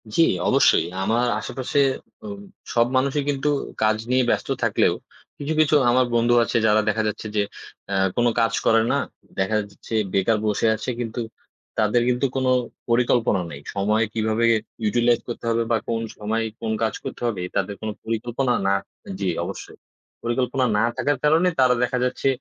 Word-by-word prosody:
জ্বি, 165 - +6 0.3
অবশ্যই। - - +4 0.2
আমার 115 +5 +1
আশেপাশে 130 +2 -2 0.5
অম 205 -1 -6 0.3
সব 120 0 +3
মানুষই 140 +2 +1
কিন্তু 145 +1 0 0.3
কাজ 110 0 +3
নিয়ে 130 0 +3
ব্যস্ত - - 0
থাকলেও - - +3 0.4
কিছু, 145 +2 -3
কিছু 155 -1 +4
আমার 125 +1 +4
বন্ধু 120 +1 +3
আছে 115 - 0
যারা 110 0 +4
দেখা 110 - 0
যাচ্ছে 105 +1 -4
যে 105 - +3 0.5
অ্যা 100 - 0 0.2
কোনো 120 0 +4
কাজ 115 0 +2
করে 115 0 +5
না। - - +2 0.4
দেখা 95 +3 +1
যাচ্ছে 105 - -11 0.2
বেকার 100 +3 +2
বসে 105 +1 0
আছে 110 - -5
কিন্তু 120 0 -4 0.6
তাদের 110 +3 +3
কিন্তু 125 +2 +1
কোনো 130 -1 +1 0.4
পরিকল্পনা 120 -4 +2
নেই। 70 - -9
সময় 105 +3 +2
কিভাবে 110 +1 +1 0.4
ইউটিলাইজ 120 +2 +3
করতে 120 0 -6
হবে 115 0 +1
বা 115 - +4
কোন 115 -1 0 0.2
সময় 110 +2 -1 0.2
কোন 110 -1 -2
কাজ 110 - 0
করতে - - -7
হবে 105 -6 -2
তাদের 100 - -1
কোনো 110 -1 -3
পরিকল্পনা 120 +3 -1
না 100 - +3 0.5
জি 100 - -1 0.2
অবশ্যই। 95 +3 -7 0.5
পরিকল্পনা 125 +2 0
না - - +3 0.2
থাকার 145 +2 +1
কারণে 160 +4 +4
তারা 130 -1 +5
দেখা 125 +1 0
যাচ্ছে 125 +2 -1
115 Hz, 165 wpm, -23 LUFS, 110-125 Hz, 0.6 s, জ্বি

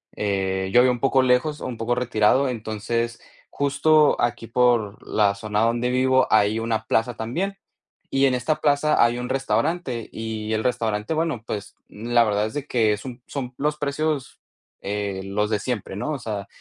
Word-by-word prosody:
Eh, 95 -2 -1
yo 120 - +6
vivo 130 - +4
un 125 - -3
poco 135 -1 +3
lejos 130 +4 +1
o - - -5
un 125 -2 -5
poco 115 +2 0
retirado, 125 +2 +2
entonces 115 0 -3 0.3
justo 145 +2 +3
aquí 120 -1 -1
por 115 -4 +1
la 100 -2 +2
zona 105 +1 -2
donde 115 +2 +1
vivo, 130 +1 +3
hay 110 +1 +3
una 115 -1 -2
plaza 115 +1 0
también. 175 - -3 0.5
Y 135 0 +3
en 130 - +1
esta 150 +5 0
plaza 150 +1 +3
hay 120 +1 +2
un 125 +1 -4
restaurante 130 0 -1
y 110 -1 -4
el 110 0 0
restaurante, 110 0 -1
bueno, 155 -8 -1
pues, 105 -1 -6
n 115 +3 -7
la 120 -1 +6
verdad 105 -1 +1
es 110 - -5
de 145 0 -4
que 110 -4 +2
son 125 +1 -9
son 130 -3 -5
los 150 +1 -1
precios, 145 -1 -2 0.4
eh, 100 -1 -3
los 105 +2 -1
de 105 - +1
siempre, 105 -4 -4
¿no? 150 +9 -3
o 140 - -3
sea, 105 -4 -5
120 Hz, 185 wpm, -23 LUFS, 110-135 Hz, 0.5 s, yo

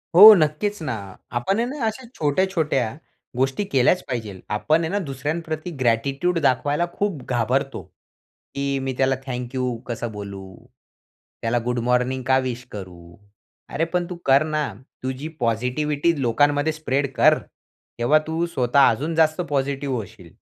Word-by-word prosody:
हो, 215 +4 +12
नक्कीच 170 +5 0
ना. 130 -5 -2 0.4
आपण 160 - 0
आहे 235 - +1
ना 265 -2 -3
अशा 220 +3 -3
छोट्या, 155 +5 +2
छोट्या 135 - 0 0.4
गोष्टी 135 +9 +1
केल्याच 135 +7 +3
पाहिजे. 110 -7 -4 0.2
आपण 155 +8 +2
आहे 160 - -2
ना 205 - 0
दुसऱ्यांप्रती 155 +5 -4
ग्रॅटिट्यूड 135 +9 +1
दाखवायला 145 +6 +1
खूप 200 -9 -2
घाबरतो, 130 +3 0
की 140 - -12 0.2
मी 135 -1 -2
त्याला 135 0 +2
थँक 125 -1 -5
यू 125 -2 -1
कसं 120 -1 -4
बोलू? 100 -2 -7 1.0
त्याला 115 +1 +1
गुड 125 -1 0
मॉर्निंग 125 +1 +1
का 130 0 +5
विश 125 0 -5
करू? 90 -4 -10 0.5
अरे 165 - 0
पण 175 -1 +1
तू 180 - -5
कर 135 +2 +5
ना. 155 -2 -1 0.4
तुझी 130 +4 -4
पॉझिटिव्हिटी 140 +7 0
लोकांमध्ये 145 +5 +2
स्प्रेड 140 -3 -1
कर. - - +5 0.6
तेव्हा 150 +6 +4
तू 165 +2 0
स्वतः 135 -3 +3
अजून 160 +3 -2
जास्त 160 +1 +3
पॉझिटिव्ह 135 -1 -1
होशील 105 -6 -8
135 Hz, 145 wpm, -23 LUFS, 125-160 Hz, 1.0 s, हो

